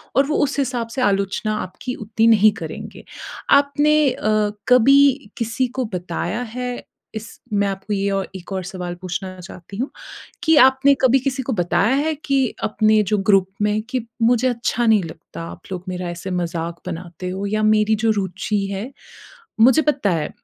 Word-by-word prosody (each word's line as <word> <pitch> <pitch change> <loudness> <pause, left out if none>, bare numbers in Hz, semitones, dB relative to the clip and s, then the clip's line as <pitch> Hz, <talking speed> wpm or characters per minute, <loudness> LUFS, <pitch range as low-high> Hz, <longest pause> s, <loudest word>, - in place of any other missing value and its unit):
और 275 - +4
वो 305 - 0
उस 290 0 -1
हिसाब 250 -4 -1
से 265 - -1
आलोचना 200 0 0
आपकी 250 +7 -6
उतनी 220 +1 0
नहीं 215 -1 +6
करेंगे। - - -7 0.5
आपने 290 +1 +3
अ, 215 -3 0 0.2
कभी 275 +3 +5
किसी 230 +2 -1
को 250 +1 -3
बताया 175 +4 -3
है 250 -1 -4 0.3
इस 220 0 -5 0.3
मैं 200 0 +2
आपको 195 +1 -4
ये 200 0 0
औ 195 0 0
एक 185 +1 -10
और 190 -1 -2
सवाल 180 -1 -6
पूछना 185 +1 -6
चाहती 180 +1 -11
हूँ 255 +5 -2 0.5
कि, 320 -2 +4
आपने 265 0 +6
कभी 260 0 +5
किसी 265 0 -2
को 260 - -3
बताया 175 +3 +1
है 310 +3 0
कि 270 -2 +2 0.2
अपने 215 0 +3
जो 210 +1 0
ग्रुप 195 -1 +3 0.2
में 210 +1 +1
कि 255 -3 -2 0.2
मुझे 245 +2 +3
अच्छा 240 0 -1
नहीं 220 -3 +4
लगता 160 +1 -9
आप - - -11
लोग 180 -1 -5
मेरा 180 -1 -4
ऐसे 175 +2 -6
मज़ाक 170 -1 -3
बनाते 175 0 -6
हो 190 +2 -4
या 215 +1 -1
मेरी 215 0 +3
जो 225 - +3
रुचि 195 +1 -2
है 200 +6 -5 0.7
मुझे 260 +7 +6
पता 280 -8 +1
है, 160 -4 -1
215 Hz, 175 wpm, -21 LUFS, 190-255 Hz, 0.7 s, नहीं